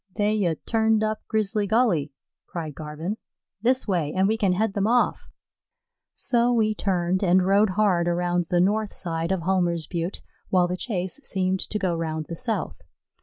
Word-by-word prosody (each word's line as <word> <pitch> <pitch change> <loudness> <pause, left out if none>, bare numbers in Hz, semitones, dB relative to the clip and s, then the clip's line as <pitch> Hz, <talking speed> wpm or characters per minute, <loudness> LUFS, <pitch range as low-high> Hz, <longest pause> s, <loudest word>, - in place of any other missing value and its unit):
"They 210 0 +1
'ye 185 -7 +1
turned 220 -1 +2
up 215 0 -1
Grizzly 210 -1 0
Gully," 205 - +2 0.4
cried 160 -4 -5
Garvin. 155 +7 -5 0.4
"This 255 +3 +1
way, 170 -7 0
and 190 +1 +4
we 220 - +2
can 200 -5 +1
head 210 +2 0
them 200 0 0
off." 245 +1 +1 0.9
So 240 0 +1
we 220 -3 +2
turned 185 -3 0
and 180 0 +4
rode 200 +2 +4
hard 185 -5 +3
around 175 0 0
the 175 - +2
north 210 +3 +1
side 165 -1 -3
of 190 -3 -1
Hulmer's 175 -3 +1
Butte, 170 +3 -4 0.3
while 180 -2 +3
the 180 - -2
chase 190 +2 -3
seemed 190 -5 -1
to 210 - -1
go 190 -4 0
round 160 -2 -3
the 170 - -4
south. 195 - -3
190 Hz, 170 wpm, -25 LUFS, 175-215 Hz, 0.9 s, and